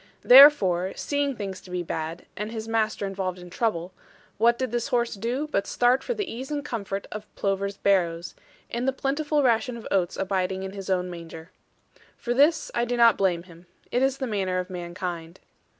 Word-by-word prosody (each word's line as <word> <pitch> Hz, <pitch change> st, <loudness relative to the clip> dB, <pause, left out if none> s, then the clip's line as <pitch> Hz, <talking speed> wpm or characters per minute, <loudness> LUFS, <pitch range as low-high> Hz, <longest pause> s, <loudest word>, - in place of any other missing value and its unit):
Therefore, 205 Hz, -10 st, +7 dB
seeing 285 Hz, -2 st, -1 dB
things 195 Hz, -4 st, -6 dB
to -, -, -15 dB
be 180 Hz, -1 st, -3 dB
bad, 160 Hz, 0 st, -5 dB
and 210 Hz, +2 st, -4 dB
his 220 Hz, -1 st, -5 dB
master 220 Hz, -2 st, 0 dB
involved 190 Hz, -2 st, -3 dB
in 180 Hz, -1 st, -12 dB
trouble, 180 Hz, -4 st, -1 dB, 0.5 s
what 235 Hz, +1 st, +4 dB
did 260 Hz, -2 st, -2 dB
this 240 Hz, -1 st, -1 dB
horse 240 Hz, -3 st, 0 dB
do 240 Hz, +8 st, -2 dB
but 195 Hz, -, 0 dB
start 245 Hz, +2 st, +2 dB
for 485 Hz, -, -2 dB
the 415 Hz, -, -2 dB
ease 260 Hz, -2 st, -6 dB
and 295 Hz, -1 st, -3 dB
comfort 200 Hz, -6 st, -4 dB
of 215 Hz, 0 st, -7 dB
Plover's 200 Hz, 0 st, -1 dB
Barrows, 175 Hz, -4 st, +1 dB, 0.4 s
and 240 Hz, +2 st, -2 dB
the 265 Hz, -, +2 dB
plentiful 290 Hz, +2 st, 0 dB
ration 240 Hz, 0 st, +1 dB
of 230 Hz, -, -10 dB
oats 185 Hz, -3 st, +1 dB
abiding 190 Hz, 0 st, -1 dB
in 190 Hz, -, -5 dB
his 195 Hz, -1 st, -8 dB
own 180 Hz, -1 st, 0 dB
manger. 165 Hz, -1 st, -10 dB, 0.7 s
For 240 Hz, -, -2 dB
this 295 Hz, +6 st, +3 dB
I 235 Hz, -, +1 dB
do 240 Hz, 0 st, -1 dB
not 235 Hz, -2 st, +6 dB
blame 180 Hz, -3 st, 0 dB
him. 175 Hz, -1 st, -17 dB, 0.2 s
It 245 Hz, -, +1 dB
is 270 Hz, 0 st, +2 dB
the 270 Hz, -, -3 dB
manner 195 Hz, -5 st, -1 dB
of 180 Hz, +1 st, -3 dB
mankind. 175 Hz, -1 st, -6 dB
200 Hz, 195 wpm, -25 LUFS, 185-245 Hz, 0.7 s, Therefore